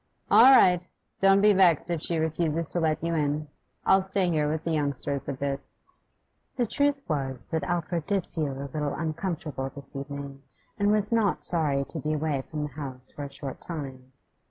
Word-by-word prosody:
'All 235 - +8
right. 180 -5 +5 0.4
Don't 195 0 +5
be 210 0 +6
vexed 180 -3 +4
if 165 -3 -1
she 170 - -1
refuses 160 0 0
to 175 - -1
let 155 -1 0
you 170 0 0
in. 150 -1 0 0.4
I'll 190 0 +5
stay 190 -1 0
here 150 -2 +1
with 155 0 -3
the 165 - -2
youngsters 140 -2 -2
a - - -1
bit.' 140 0 -2 1.0
The 245 - +1
truth 285 +5 +1
was 135 -5 -2
that 160 -1 0
Alfred 170 0 -2
did 195 -3 +1
feel 140 -4 -2
a 140 - -8
little 150 -2 -2
uncomfortable 160 -4 -3
this 140 0 -12
evening, 140 0 -6 0.4
and 205 0 +3
was 210 +1 +2
not 220 -4 +1
sorry 145 -5 +2
to 165 - -5
be 155 +2 -1
away 150 -2 -1
from 150 -1 -3
the 150 - -3
house 130 -4 -7
for - - -9
a 140 - -9
short 135 -2 -7
time. 135 -6 -6
155 Hz, 190 wpm, -27 LUFS, 140-175 Hz, 1.0 s, All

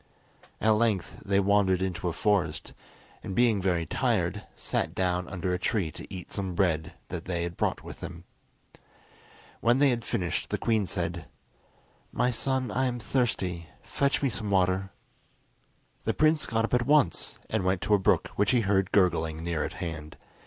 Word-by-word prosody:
At 110 - +3
length 110 -3 +1
they 100 0 +2
wandered 100 -2 +3
into 95 -1 -2
a - - +1
forest, 100 +2 0 0.5
and 95 - -5
being 115 -5 +3
very 90 -3 +1
tired, - - 0
sat - - -2
down 90 -1 0
under 90 -1 -2
a 90 - -1
tree 90 -5 0
to - - -10
eat 90 -3 -8
some 95 -3 -3
bread 80 -5 +1 0.2
that - - -5
they 85 -2 -1
had 85 0 -4
brought - - -1
with - - -9
them. 85 -1 -8 1.4
When 120 +2 +3
they 140 -1 +5
had 120 -2 -2
finished 90 -6 -2
the - - 0
queen 110 -4 +1
said: 85 -3 -3 0.8
"My 125 - +1
son, 130 +2 -1
I 130 - +1
am 125 -1 -1
thirsty; 95 -9 -1 0.2
fetch 140 0 0
me 135 - +3
some 110 -3 -3
water." 95 0 +2 1.2
The - - 0
prince 155 0 +3
got 115 -1 +1
up - - -7
at 125 0 +2
once 150 -1 +3
and 110 -3 -1
went 95 0 +1
to 105 - +1
a 105 - +5
brook 95 - +2
which 105 0 +3
he 125 -2 +4
heard 95 -2 +1
gurgling 80 -5 +2
near 85 -2 -1
at - - -4
hand. 75 -3 -6
95 Hz, 175 wpm, -28 LUFS, 90-115 Hz, 1.4 s, they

